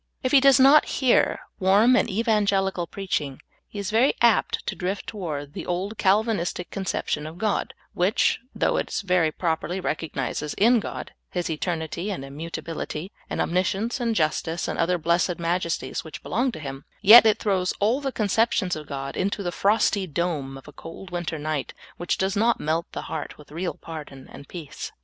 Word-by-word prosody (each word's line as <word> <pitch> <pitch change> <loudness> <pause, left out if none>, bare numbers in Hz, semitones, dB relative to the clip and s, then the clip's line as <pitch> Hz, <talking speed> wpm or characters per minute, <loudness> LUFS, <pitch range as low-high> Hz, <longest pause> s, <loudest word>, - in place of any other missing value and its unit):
If 255 - 0
he 280 - +7
does 270 -1 +6
not 275 +3 +7
hear 260 -3 +3 0.2
warm 205 +6 +5
and - - +2
evangeHcal 200 -4 +1
preaching, 150 -9 -3 0.3
he - - -11
is 200 +1 -3
ver}^ 235 +5 +4
apt 235 -2 +3
to - - -3
drift 190 +2 -3
to 215 - -9
ward 145 -6 -5
the - - -6
old 190 +5 -3
Calvinistic 195 -3 +1
conception 170 -5 -2
of 160 +2 -9
God, 215 +1 -1 0.2
which, 185 +4 +2 0.2
though - - +1
it - - -2
ver} 180 -4 +2
properly 170 +3 -2
recognizes 150 -3 -3
in 235 +4 +5
God - - -6 0.2
His 175 -2 -2
eternity, 165 +3 -3
and 175 -9 -4
immutability, 165 +3 -6 0.2
and - - -3
omniscience, 195 +7 0
and 230 -2 0
justice, 160 0 0
and - - -3
other 180 +2 +2
blessed 170 +2 +1
majesties 170 -5 -2
which 160 - -9
belong 245 +6 0
to - - -7
Him, 135 -2 -7 0.2
yet 225 +3 +10
it 215 0 +4
throws 190 -5 0
all 230 +7 +2
the 270 -1 -2
conceptions 215 -4 +1
of 155 -1 -8
God 135 -1 -5
into 200 +2 -1
the 175 - -2
frosty 200 0 +2
dome 150 -5 -2
of 135 - -14
a 150 - -11
cold 180 +5 -10
winter 175 -2 -3
night, 150 -2 -3 0.2
which 175 - -1
does 190 0 0
not 230 +3 +2
melt 160 +2 -1
the - - -5
heart 160 - -6
with 150 - -16
real 175 +3 -3
pardon 150 -5 -9
and 140 - -11
peace. 165 -6 -7
180 Hz, 180 wpm, -25 LUFS, 160-210 Hz, 0.3 s, yet